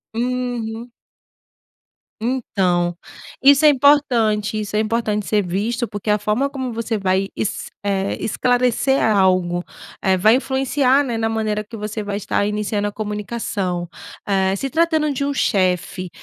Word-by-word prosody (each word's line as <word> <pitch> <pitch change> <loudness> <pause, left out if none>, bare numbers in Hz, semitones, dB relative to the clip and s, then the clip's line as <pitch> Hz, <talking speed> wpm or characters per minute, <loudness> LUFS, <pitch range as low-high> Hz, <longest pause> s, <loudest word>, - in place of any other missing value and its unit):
Uhum. 245 -1 -3 1.3
Então, 185 -8 0 0.5
isso 280 +2 +6
é - - +9
importante. 235 -7 +3
Isso 210 0 -4
é - - +3
importante 215 -1 -1
ser 210 +1 +2
visto 220 +7 -1
porque 205 +1 -6
a 210 - +4
forma 215 +7 0
como 260 -3 -4
você 225 0 -2
vai 190 0 0
es 210 - -3
eh, 195 -1 -1
esclarecer 250 +3 +1
algo, 185 -4 +2 0.4
eh, 190 -1 +3
vai 215 +5 +5
influenciar, 270 +1 +2
né, 240 -4 -3
na 225 0 0
maneira 215 -1 -1
que 215 +2 -11
você 215 0 -4
vai 205 0 -3
estar 205 0 -1
iniciando 210 0 -1
a - - -3
comunicação. 205 -4 -3 0.4
Eh, 190 -1 +1
se 270 +7 -3
tratando 315 -1 +1
de 280 0 -2
um 285 - -1
chefe, 185 -5 0
215 Hz, 145 wpm, -20 LUFS, 200-250 Hz, 1.3 s, é